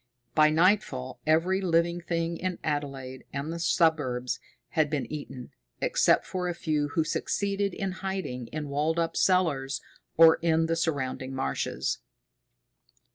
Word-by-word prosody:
By 155 -1 +6
nightfall 160 -6 +1
every 175 +5 +3
living 170 -1 +1
thing 170 0 -1
in 185 0 -3
Adelaide 135 -3 -3
and 140 +4 -3
the 170 - -5
suburbs 145 -8 +1 0.3
had 155 -2 +1
been 150 -3 -1
eaten, 135 -4 -7 0.3
except - - +3
for 180 -1 -2
a 175 - -3
few 155 -3 0
who 160 - +3
succeeded 200 +3 -1
in 195 -1 -2
hiding 185 -11 -4
in 150 +1 -5
walled 150 +4 0
up 165 -1 0
cellars, 160 -8 +2 0.4
or 165 0 +8
in 165 -1 +3
the 165 0 0
surrounding 135 -5 -2
marshes. 70 - -2
160 Hz, 135 wpm, -28 LUFS, 140-175 Hz, 0.4 s, or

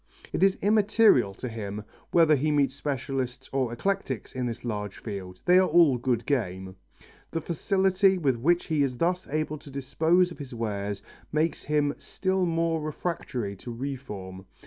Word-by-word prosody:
It - - -1
is 195 0 +4
immaterial 205 - +4
to 125 - -5
him 105 -3 -5 0.3
whether 165 -3 +5
he 150 +3 0
meets 140 -3 +2
specialists 135 -2 -3
or 130 -3 0
eclectics 135 - -2
in 125 -1 -2
this 120 +1 -5
large 105 -3 -4
field 95 -4 -7
they 180 +1 +6
are 185 - +4
all 155 -6 +5
good 120 -2 0
game. 95 -8 -2 0.5
The 165 - -2
facility 190 +4 +2
with 140 -7 +1
which 170 +9 +2
he 155 -3 0
is 130 -3 0
thus 180 +4 0
able 155 0 -2
to 145 - -13
dispose 160 +7 +2
of 170 - -10
his 135 -3 -7
wares 100 -3 -3 0.3
makes 155 +2 0
him 150 -1 +1
still 190 -1 -1
more 165 -1 0
refractory 150 - -3
to 120 - -8
reform. 105 -8 -6
140 Hz, 165 wpm, -27 LUFS, 115-170 Hz, 0.5 s, they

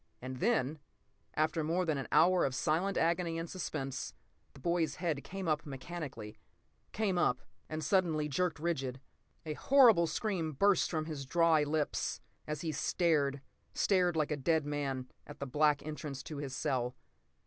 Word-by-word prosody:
And 130 +1 -6
then, 155 - +1 0.6
after 155 +1 +1
more 170 +4 +1
than 155 -4 0
an 135 - -5
hour 180 +1 +5
of 135 -2 0
silent 175 +9 +1
agony 170 0 +1
and 165 +1 -3
suspense, 135 -7 -4 0.4
the 140 - -14
boy's 170 +2 0
head 160 -5 -2
came 195 -1 -5
up 155 0 +1
mechanically. 135 -6 -7 0.5
Came 200 -5 0
up—and 155 +3 -2
suddenly 165 -6 +2
jerked 165 +3 0
rigid. 135 -6 -2 0.5
A 155 - -2
horrible 245 - +6
scream 165 -2 -2
burst 200 +7 +3
from 155 -2 -1
his 155 -3 -5
dry 165 0 +4
lips 150 0 -1 0.3
as 150 -1 -3
he 165 - -2
stared—stared 160 +4 0
like 155 -2 0
a 150 - 0
dead 155 +2 +1
man—at 145 -1 -5
the 140 - -3
black 145 +2 +2
entrance 150 -3 -5
to 155 - -7
his 140 -2 -4
cell. 125 -2 -1
155 Hz, 150 wpm, -33 LUFS, 140-170 Hz, 0.6 s, horrible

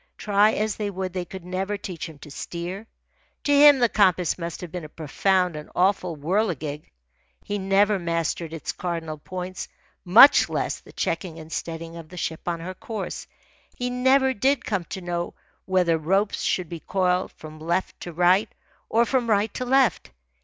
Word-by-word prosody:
Try 210 +1 +3
as 215 0 -1
they 210 -1 -2
would, 185 -2 -4
they 180 -1 -3
could 185 0 -9
never 190 +3 -2
teach 180 -4 -6
him 155 - -13
to 145 +1 -12
steer. 175 +8 -6 0.6
To 290 - +2
him 290 0 +8
the 245 -2 +4
compass 185 -6 +3
must 170 -2 -6
have 175 -3 -7
been 180 -1 -5
a 155 - -8
profound 180 +4 0
and 150 0 -8
awful 180 -2 +1
whirligig. 155 -3 -1 0.5
He 205 0 -3
never 195 +1 +3
mastered 170 -1 -2
its 165 -1 -4
cardinal 165 -3 -4
points, 185 +3 -6 0.4
much 215 +10 +8
less - - -2
the - - -16
checking 165 0 -3
and 160 0 -11
steadying 165 +1 -5
of 165 -2 -10
the 180 - -11
ship 165 -1 -4
on 170 -1 -2
her 185 +3 -5
course. 210 +1 -6 0.5
He 250 0 -3
never 260 +1 +3
did 260 +3 +1
come 195 -5 -1
to 190 - -6
know 175 -1 -3 0.3
whether 180 -4 +2
ropes 195 +6 +1
should 180 -2 0
be 170 +1 -7
coiled 180 +1 0
from 155 0 -11
left 170 +4 -2
to 175 - -7
right 180 +4 +3 0.4
or 230 +1 +3
from 245 -2 0
right 210 0 +2
to 255 - -3
left. 265 -1 +2
185 Hz, 180 wpm, -24 LUFS, 165-205 Hz, 0.6 s, him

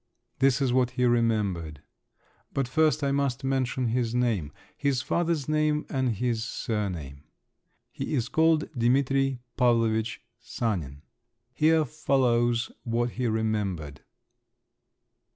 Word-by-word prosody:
This 135 0 +3
is 125 -2 +1
what 125 -1 +3
he 125 - +3
remembered…. 105 - 0 0.7
But 135 -2 0
first 155 +1 +2
I 140 - +1
must 140 -2 0
mention 130 -2 0
his 120 0 -1
name, 110 -12 0 0.2
his 135 -3 0
father's 170 -4 0
name 155 0 +1
and 130 -4 0
his 115 +1 -1
surname. 90 - -4 0.7
He - - -3
was 120 -3 0
called 160 0 +2
Dimitri 135 +1 +1 0.2
Pavlovitch 115 -3 +2 0.2
Sanin. 90 - -3 0.5
Here 160 0 +3
follows 120 -4 +1
what 120 0 -1
he 125 +1 -2
remembered. 105 -9 -2
120 Hz, 115 wpm, -27 LUFS, 110-135 Hz, 0.7 s, This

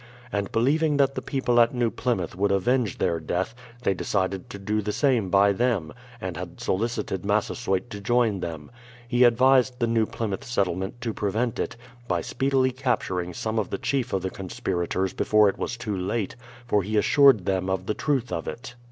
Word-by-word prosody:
And 100 -1 -2
believing 145 +6 +2
that 135 -1 +3
the - - -4
people 125 -4 +1
at 115 +2 +3
New 120 -2 +1
Plymouth 115 -10 -2
would 100 +2 +1
avenge 120 +3 +1
their 85 -2 0
death, 90 +7 -2 0.3
they 100 - +2
decided 95 0 -2
to - - -7
do 105 +2 -1
the 105 +1 -2
same 115 -3 +1
by 100 +2 +5
them, 105 -8 0 0.3
and 95 -5 -5
had 85 -1 -7
solicited 105 -2 -2
Massasoyt 105 0 0
to 100 - -6
join 115 -2 +2
them. 80 -4 -6 0.4
He 120 +1 +3
advised 125 +1 +4
the 120 - +1
New 115 -2 +1
Plymouth 115 -4 -4
settlement 95 -1 -2
to 115 -2 -2
prevent 110 +4 -1
it, - - -2 0.3
by 90 -4 0
speedily 130 +5 +1
capturing 115 -9 -1
some 110 0 -1
of 105 - -2
the - - -2
chief 130 0 -1
of 95 -1 -1
the 95 - -2
conspirators 95 0 -2
before 105 -1 +4
it - - -5
was 120 - -3
too 110 -4 -3
late, 95 +4 -2 0.3
for 105 -4 +2
he 105 +3 -2
assured 135 -3 +5
them 95 -1 0
of 95 -1 -1
the 105 - 0
truth 135 -3 -1
of 80 - -3
It. 120 0 -6
105 Hz, 190 wpm, -25 LUFS, 95-120 Hz, 0.4 s, by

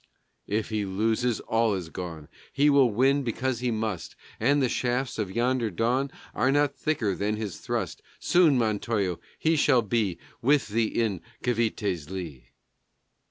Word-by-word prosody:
If 105 +1 -1
he 110 -2 -1
loses, 110 +5 0
all 115 -2 +1
is 90 -4 -5
gone; 80 -4 -7 0.2
He 145 +1 +4
will 140 -3 +5
win 135 +6 +3
because 125 0 -2
he 125 0 -1
must. 110 -6 -3 0.2
And 140 +6 +3
the 130 - +3
shafts 125 0 -1
of 105 -3 -1
yonder 120 +2 0
dawn 120 +8 0 0.2
Are 130 - +2
not 145 0 +2
quicker 120 -10 0
than 105 +3 -1
his 105 -4 -5
thrust. - - -3 0.2
Soon, 170 -6 +4
Montojo, 105 -5 0 0.2
he 165 +1 +2
shall 135 -5 +4
be 105 -5 0 0.2
With 140 -1 +3
thee 110 +1 +1
in 110 -7 -1 0.2
Cavité's 105 -9 -1
lee. 80 -10 -7
115 Hz, 155 wpm, -27 LUFS, 100-130 Hz, 0.2 s, will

